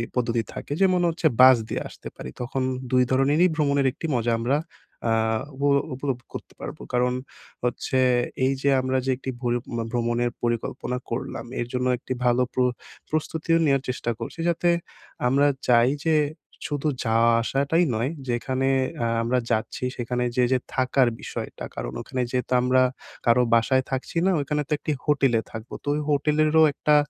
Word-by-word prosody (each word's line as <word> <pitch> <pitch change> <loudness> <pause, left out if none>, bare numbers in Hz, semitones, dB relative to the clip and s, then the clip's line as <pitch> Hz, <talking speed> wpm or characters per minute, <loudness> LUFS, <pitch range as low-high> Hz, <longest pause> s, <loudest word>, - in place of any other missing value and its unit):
পদ্ধতি 120 -2 +1
থাকে - - -5
যেমন 185 -2 +4
হচ্ছে 165 0 +1
বাস 130 -1 +9
দিয়ে - - -2
আসতে - - -11
পারি। 65 - -7
তখন 130 +2 -2 0.3
২ 125 0 +5
ধরণেরই 140 +7 +4
ভ্রমণের 140 -3 +2
একটি 155 +5 -8
মজা 120 0 +1
আমরা 125 +5 +1 0.5
আ - - +2 0.4
উপ 140 - -10 0.3
উপলব্ধ 135 -2 -3
করতে - - -8
পারবো। - - -7
কারণ 125 0 +2 0.5
হচ্ছে 125 +2 -1 0.5
এইযে 135 +1 +1
আমরা 130 0 0
যে - - -1
একটি 135 - -6
ভরি 120 -1 +1 0.3
ভ্রমণের 120 0 0
পরিকল্পনা 120 +1 -2
করলাম, 115 - -4
এর 120 - -2
জন্য 125 0 0
একটি 125 - -5
ভালো 125 +1 +3
প্র - - -3 0.5
প্রস্তুতিও 160 +1 0
নেওয়ার 135 -2 +2
চেষ্টা 125 -2 -2
করছি 115 +7 -7
যাতে, 170 +1 +1 0.6
আমরা 140 +3 +3 0.2
চাই 120 0 +5 0.2
যে, 160 -1 +3 0.5
শুধু 145 0 -2 0.2
যাওয়া 115 0 +3
আসাটাই 140 +7 +1
নয় 115 +4 0 0.2
যেখানে 130 +2 0 0.4
আ - - +1 0.2
আমরা 120 +2 +1
যাচ্ছি 110 +2 -1
সেখানে 125 +1 -2
যে 125 - +3
যে 130 - +3 0.2
থাকার 130 0 +3
বিষয়টা - - -6
কারণ - - -4
ওখানে 130 - -3
যেহেতু 125 0 -1
আমরা 130 +1 +3 0.4
কারো 120 +1 +5
বাসায় 130 +3 +3
থাকছি 130 +5 -3
না, 190 - +4
ওইখানে 150 +1 -1
তো - - -20
একটি 155 - -3
হোটেলে 135 -6 +3
থাকবো, 110 0 -8
তো - - -14
ওই 150 - -1
হোটেলেরও 155 +2 +3
একটা 150 +2 +2
130 Hz, 160 wpm, -25 LUFS, 120-145 Hz, 0.6 s, বাস